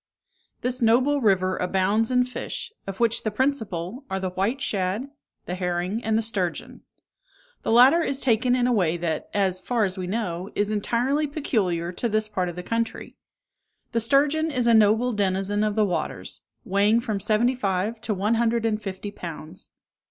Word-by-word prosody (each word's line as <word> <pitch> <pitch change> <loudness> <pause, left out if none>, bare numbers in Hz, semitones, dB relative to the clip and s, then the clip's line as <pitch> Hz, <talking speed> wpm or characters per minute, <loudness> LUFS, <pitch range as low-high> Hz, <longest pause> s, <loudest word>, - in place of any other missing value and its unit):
This 250 +1 -2
noble 255 +5 +3
river 185 -4 +2
abounds 195 +4 +1
in 250 -1 +3
fish, 250 - -6
of 195 -1 -6
which 230 -1 +2
the 215 - -1
principal 220 - -2
are 190 - -2
the 190 -1 -3
white 200 +9 -1
shad, 210 +2 -2 0.3
the 180 - -4
herring, 180 +4 -2
and 220 0 +1
the 225 - +1
sturgeon. 190 -6 -3 0.8
The - - -4
latter 260 +8 +7
is 275 -4 -1
taken 245 0 +2
in 245 -1 +1
a 250 - +2
way 175 -6 +1
that, 165 -2 -3
as 190 -2 0
far 235 +3 0
as 190 -1 -1
we 180 - -3
know, 185 -3 -3
is 205 +1 +1
entirely 245 +8 0
peculiar 195 - -1
to 230 +6 -2
this 215 0 +1
part 185 -4 -2
of 175 - -7
the 180 - -6
country. 230 +3 -3 0.8
The 235 - +1
sturgeon 290 +7 +2
is 250 -5 -1
a 235 - +5
noble 220 +3 +4
denizen 200 0 0
of 210 -1 0
the 215 -1 +3
waters, 160 - -4 0.2
weighing 205 +4 +3
from 220 -4 -2
seventy 220 +5 +2
five 210 -1 -2
to 215 - -2
one 205 +4 +1
hundred 230 0 +1
and 215 -1 0
fifty 195 0 -6
pounds. 170 -2 -8
215 Hz, 180 wpm, -25 LUFS, 185-240 Hz, 0.8 s, latter